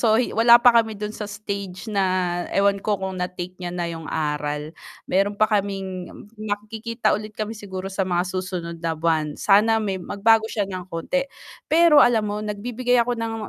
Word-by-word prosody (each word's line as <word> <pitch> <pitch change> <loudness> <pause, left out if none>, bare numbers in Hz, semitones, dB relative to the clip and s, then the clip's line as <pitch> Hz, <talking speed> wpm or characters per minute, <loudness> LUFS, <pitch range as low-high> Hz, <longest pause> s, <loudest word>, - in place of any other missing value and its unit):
So, 220 -2 +4
wala 235 -1 +5
pa 245 - +8
kami 220 -1 -5
dun 210 +1 -5
sa 210 - -6
stage 200 -2 -6
na, 185 -3 +1
ewan 200 0 +3
ko 210 0 0
kung 190 -1 -5
na-take 180 0 -4
niya 180 - -4
na 175 -1 -2
'yung 165 -1 -7
aral. 150 -1 -2 0.3
Meron 200 +2 +1
pa 215 - +4
kaming 195 -3 -2 0.3
magkikita 215 +2 -2
ulit 215 0 -4
kami 215 0 -3
siguro 190 -2 -6
sa 190 0 -1
mga 175 -1 +1
susunod 180 -3 -4
na 165 -1 -1
buwan, 155 -2 0
sana 215 +3 +4
may 195 -3 -2
magbago 220 +4 +2
siya 210 -2 -1
ng 185 -2 -7
konti. 270 +12 -2 0.4
Pero 325 -2 +6
alam 230 -3 +4
mo, 205 0 -3
nagbibigay 235 +4 -1
ako 245 +1 -1
ng 225 0 -3
200 Hz, 180 wpm, -23 LUFS, 180-220 Hz, 0.4 s, pa